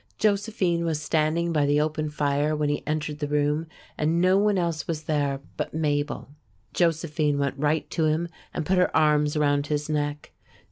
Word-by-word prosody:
Josephine 200 -5 +1
was 160 -3 -1
standing 160 +2 0
by 145 -2 +2
the 145 +1 +3
open 155 0 -1
fire 150 +1 0
when 150 -1 0
he 145 - -1
entered 150 -1 -2
the 145 - -2
room, 150 +2 0 0.3
and 160 +3 +2
no 185 +2 +4
one 205 0 +3
else 170 -3 -1
was 160 -2 -3
there 145 -3 -1 0.2
but - - -3
Mabel. 145 -3 -1 0.4
Josephine 155 -3 +1
went 140 -1 0
right 150 +2 0
to 160 - +1
him 155 +2 +1 0.2
and - - -3
put 185 +3 +2
her 180 - +2
arms 150 -1 +3
around 145 -1 +2
his 150 0 -2
neck. 145 -1 -2
155 Hz, 180 wpm, -25 LUFS, 145-165 Hz, 0.4 s, no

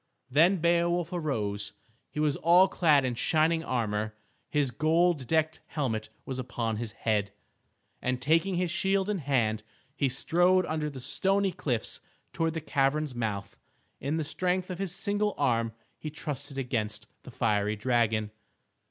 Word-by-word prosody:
Then 170 +8 +5
Beowulf 170 0 +1
arose. 105 - -2 0.4
He - - -6
was 150 -2 +2
all 175 +3 +6
clad 150 -8 +3
in 125 - 0
shining 160 +6 +2
armor, 110 -5 -1 0.3
his 145 -4 +1
gold 160 0 +2
decked 160 +1 +1
helmet 110 -8 -2 0.2
was 130 -1 -4
upon 120 -3 -2
his 110 -1 -4
head, 105 -3 0 0.7
and 125 0 -1
taking 165 +7 +2
his 175 -1 0
shield 195 +2 +1
in 200 - -1
hand 120 -7 +1 0.3
he 140 -2 +1
strode 175 +7 +3
under 155 -2 -2
the 140 -3 -8
stony 195 +8 +2
cliffs 125 -8 -2 0.3
towards 165 -1 0
the 165 - -2
cavern's 145 0 +1
mouth. 110 -5 -4 0.4
In 145 +4 -1
the 160 - 0
strength 180 +4 -1
of 180 - -5
his 195 -3 -2
single 205 +2 -1
arm 115 -2 +1 0.3
he 155 - -5
trusted 145 -2 -5
against 115 -5 -2 0.2
the - - -11
fiery 105 -1 +1
dragon. 110 -2 +1
145 Hz, 150 wpm, -29 LUFS, 120-170 Hz, 0.7 s, all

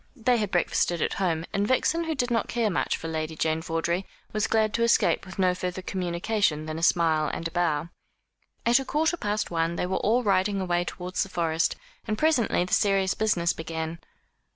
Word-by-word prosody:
They 245 -1 +2
had 210 -3 -1
breakfasted 175 -1 +1
at - - -1
home; 165 -3 0
and 200 +1 +1
Vixen, 325 +7 +1
who 320 -1 -2
did 245 -2 -1
not 230 -3 +1
care 230 -3 0
much - - 0
for 165 - -6
Lady 160 0 -3
Jane 160 0 0
Vawdrey, 165 +3 -2 0.3
was 215 -1 +1
glad 215 -1 +2
to 235 - 0
escape 230 -4 +3
with 190 - -10
no 185 -2 +3
further 180 +1 -4
communication 180 -3 -1
than 155 +1 -4
a - - -7
smile 160 -2 +3
and 165 - -3
a - - -10
bow. 170 -2 0 0.8
At 240 +3 +5
a - - -3
quarter 315 +5 +1
past 210 - -2
one 165 0 0
they 180 - -1
were 185 +1 -1
all 240 +4 +2
riding 195 -1 +2
away 175 -2 0
towards 180 +1 -4
the 195 - -2
Forest, 165 -3 0 0.3
and 215 -1 -1
presently 250 - +2
the 180 - -5
serious 195 -1 +3
business 175 -6 +1
began. 160 0 -5
185 Hz, 200 wpm, -26 LUFS, 165-215 Hz, 0.8 s, At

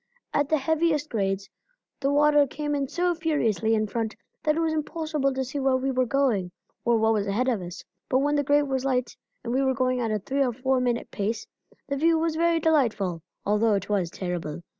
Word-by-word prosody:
At 290 0 +1
the 315 - +3
heaviest 310 +1 +1
grades 195 -2 -1 0.5
the 275 0 +1
water 295 0 +5
came 295 +2 -3
in 280 -1 0
so 355 +4 0
furiously 235 - +1
in 215 0 +1
front 220 +1 -3 0.3
that 305 0 +1
it - - -1
was 325 -1 +1
impossible 310 -2 -1
to 265 0 -2
see 265 +3 -4
where 265 -1 +2
we 265 +1 -1
were 255 -1 +1
going, 235 -9 +1 0.3
or 235 -1 +3
what 220 0 +3
was 205 -2 0
ahead 220 +6 0
of 235 -7 +1
us; 180 +1 -8 0.3
but 260 - +3
when 290 +2 +2
the 290 - +2
grade 290 +1 +3
was 265 -1 -1
light, 255 -2 0 0.3
and 240 0 -3
we 265 - +2
were 265 -1 +1
going 255 -1 +1
at 230 -2 -1
a 215 - +1
three 270 +7 0
or 250 -2 0
four 260 +2 +1
minute 245 -1 -1
pace, 215 +2 -2 0.4
the 280 - -2
view 325 +3 +3
was 320 0 0
very 335 0 +2
delightful, 225 - +1 0.2
although 210 +1 +3
it 200 - -3
was 195 -5 +1
terrible. 175 -3 -4
260 Hz, 220 wpm, -26 LUFS, 220-295 Hz, 0.5 s, water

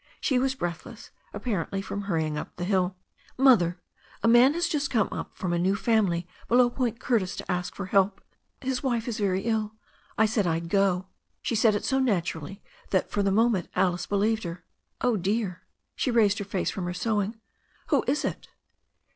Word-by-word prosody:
She 260 -4 +1
was 265 +1 0
breathless, 175 -8 -6 0.2
ap - - -8
parently 195 -4 -2
from 200 - -4
hurrying 160 -5 -1
up 150 - -6
the 175 - -5
hill. 185 -1 +1 0.4
"Mother, 210 -10 +5 0.4
a - - +4
man 245 +5 +6
has 345 0 +1
just 295 -4 -1
come 220 -5 +2
up - - -6
from 180 -2 -2
a 170 - +1
new 190 +3 +2
family 200 -6 +1 0.2
be 235 - +3
low 245 -1 +5
Point 240 -3 -1
Curtis 215 -8 0
to - - -5
ask 180 0 -2
for 200 - -4
help. 195 +1 +2 0.4
His 260 -1 -2
wife 240 -4 -1
is 230 -3 -3
very 195 -2 +1
ill. 220 -1 -1 0.4
I 220 - +5
said 215 -3 +1
I'd 165 0 -1
go." 190 -1 +2 0.4
She - - -1
said 220 -1 +4
it 205 - -2
so 265 -1 +2
naturally 190 - -1 0.3
that 190 - 0
for 205 - 0
the 200 - +2
moment 215 -2 +2
Alice 180 -1 +1
be 205 - -1
lieved 220 +2 +1
her. 170 0 -6 0.4
"Oh, 245 -3 +2
dear" 195 0 -1 0.2
— - - -53
she - - -1
raised 220 -4 +3
her 200 - -4
face 190 -1 -1
from 185 - -4
her 175 0 -3
sewing 215 +2 -1 0.2
— - - -36
"who - - +3
is 290 +3 +1
it?" - - -4
205 Hz, 205 wpm, -27 LUFS, 180-235 Hz, 0.4 s, man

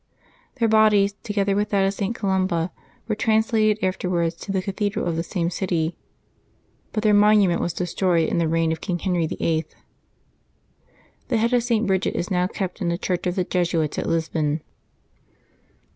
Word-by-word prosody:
Their 235 -3 +1
bodies, 215 -2 +4
together 200 -2 0
with 205 +1 0
that 195 -2 +2
of 195 - +1
St. 205 +3 -3
Columba, 185 -4 0 0.4
were 225 - 0
translated 220 0 +2
afterwards 180 -3 0
to 195 - -6
the 195 - 0
cathedral 205 +1 -2
of 170 -2 -1
the 165 - -1
same 170 0 -2
city, 170 -3 -1 1.0
but 215 - -2
their 215 -1 +4
monument 205 -4 +4
was 175 - -1
de 175 +2 -3
stroyed 175 -2 +1
in - - 0
the 165 - +1
reign 165 0 +1
of 160 - -4
King 180 -3 -2
Henry 175 -3 0
VIII. 160 0 -1 1.6
The 240 - +1
head 230 +3 +1
of 245 - +4
St. 230 -2 +1
Bridgid 190 -1 0
is 175 +2 -3
now 180 -1 +2
kept 190 +1 -5
in 175 - 0
the 170 - -1
church 180 -1 -2
of 180 - -1
the 185 - +1
Jesuits 170 -4 0
at - - -3
Lisbon. 160 -2 -1
190 Hz, 175 wpm, -23 LUFS, 170-210 Hz, 1.6 s, bodies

